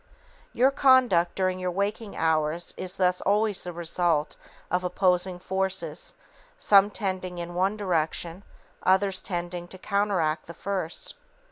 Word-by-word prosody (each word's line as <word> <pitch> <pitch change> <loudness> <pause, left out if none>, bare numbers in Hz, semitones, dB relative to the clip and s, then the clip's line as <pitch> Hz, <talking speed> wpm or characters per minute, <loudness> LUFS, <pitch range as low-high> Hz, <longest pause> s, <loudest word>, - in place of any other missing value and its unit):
Your 260 +3 +3
conduct 255 -11 +4
during 185 -1 0
your 185 0 -1
waking 200 +3 -3
hours 160 +1 0
is 185 +1 -4
thus 180 -1 +2
always 210 0 +1
the 180 - -5
result 170 -2 0 0.4
of 180 0 +1
opposing 180 0 +1
forces, 190 - -2 0.4
_some 200 - +5
tending 185 -3 -3
in 175 0 -5
one 190 +4 0
direction, 170 -2 -1 0.4
others 190 0 +2
tending 175 -1 -3
to 185 - -10
counteract 185 -6 0
the 170 - -9
first. 185 -3 -4
185 Hz, 130 wpm, -26 LUFS, 175-200 Hz, 0.4 s, some